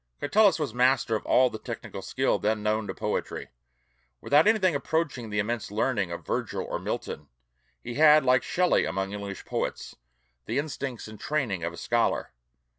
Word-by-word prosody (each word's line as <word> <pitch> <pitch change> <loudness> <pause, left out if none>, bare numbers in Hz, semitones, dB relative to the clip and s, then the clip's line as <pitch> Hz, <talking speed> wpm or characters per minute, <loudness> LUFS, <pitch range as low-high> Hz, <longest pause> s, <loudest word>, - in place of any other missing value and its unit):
Catullus 200 +7 +4
was 150 -4 -3
master 125 -2 +2
of 110 - -4
all 130 -1 +4
the 110 - -6
technical - - -7
skill - - 0
then 105 0 0
known 110 0 0
to - - -3
poetry. - - -3 0.7
Without 150 +5 +4
anything 205 -6 +4
approaching 140 -5 -1
the 105 - -3
immense 110 +1 -1
learning 105 -3 0
of 85 - -6
Virgil - - -2
or - - -3
Milton, 75 - -5 0.6
he 120 - -5
had, 150 +1 +6
like 125 -1 +4
Shelley 180 +7 +2
among 95 +1 -2
English 100 -1 -6
poets, - - -3 0.5
the 115 - -1
instincts 140 -5 -4
and 110 -1 -11
training 120 - -1
of 85 - -2
a 85 - -11
scholar. 115 - 0
120 Hz, 170 wpm, -27 LUFS, 105-145 Hz, 0.7 s, had